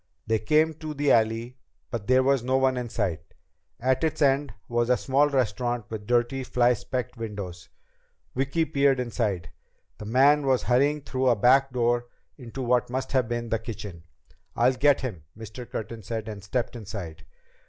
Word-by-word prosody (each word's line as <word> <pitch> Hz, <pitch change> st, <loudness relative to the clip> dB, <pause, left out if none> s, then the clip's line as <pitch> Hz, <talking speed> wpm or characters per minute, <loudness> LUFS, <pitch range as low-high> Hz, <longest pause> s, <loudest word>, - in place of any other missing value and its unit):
They 110 Hz, 0 st, +1 dB
came 155 Hz, +8 st, +3 dB
to 155 Hz, -1 st, -6 dB
the 145 Hz, 0 st, +2 dB
alley, 115 Hz, +3 st, +1 dB, 0.3 s
but 115 Hz, -4 st, -4 dB
there 130 Hz, +1 st, +4 dB
was 135 Hz, -1 st, +3 dB
no 130 Hz, +2 st, +1 dB
one 130 Hz, -1 st, +2 dB
in 125 Hz, -1 st, -4 dB
sight. 90 Hz, -7 st, -2 dB, 0.6 s
At 130 Hz, +4 st, +1 dB
its 160 Hz, -, 0 dB
end 140 Hz, -2 st, +2 dB, 0.2 s
was 120 Hz, 0 st, 0 dB
a 125 Hz, -, +4 dB
small 140 Hz, +2 st, +2 dB
restaurant 120 Hz, -3 st, -1 dB
with 105 Hz, -2 st, -6 dB
dirty, 120 Hz, +2 st, +1 dB
fly 125 Hz, -1 st, +3 dB
specked 125 Hz, +1 st, -4 dB
windows. 100 Hz, -6 st, -6 dB, 0.6 s
Vicki 140 Hz, +5 st, 0 dB
peered 140 Hz, -3 st, +2 dB
inside. 110 Hz, -8 st, -2 dB, 0.5 s
The 105 Hz, -, -7 dB
man 140 Hz, +5 st, +4 dB
was 130 Hz, -2 st, +2 dB
hurrying 140 Hz, +4 st, +2 dB
through 130 Hz, -1 st, -1 dB
a 120 Hz, -, +4 dB
back 130 Hz, +5 st, +4 dB
door 120 Hz, -1 st, +1 dB, 0.3 s
into 130 Hz, 0 st, -7 dB
what 125 Hz, 0 st, +1 dB
must 130 Hz, +1 st, -3 dB
have 130 Hz, -4 st, +2 dB
been 120 Hz, -1 st, -3 dB
the 115 Hz, -, 0 dB
kitchen. 105 Hz, -6 st, -7 dB, 0.5 s
"I'll 125 Hz, +2 st, +3 dB
get 140 Hz, +2 st, +3 dB
him," 105 Hz, -, -5 dB
Mr. 115 Hz, +2 st, -9 dB
Curtin 110 Hz, +1 st, -5 dB
said, 110 Hz, +1 st, -5 dB
and 105 Hz, -3 st, -7 dB
stepped 120 Hz, +4 st, -2 dB
inside. 100 Hz, -7 st, -7 dB
125 Hz, 175 wpm, -26 LUFS, 110-135 Hz, 0.6 s, there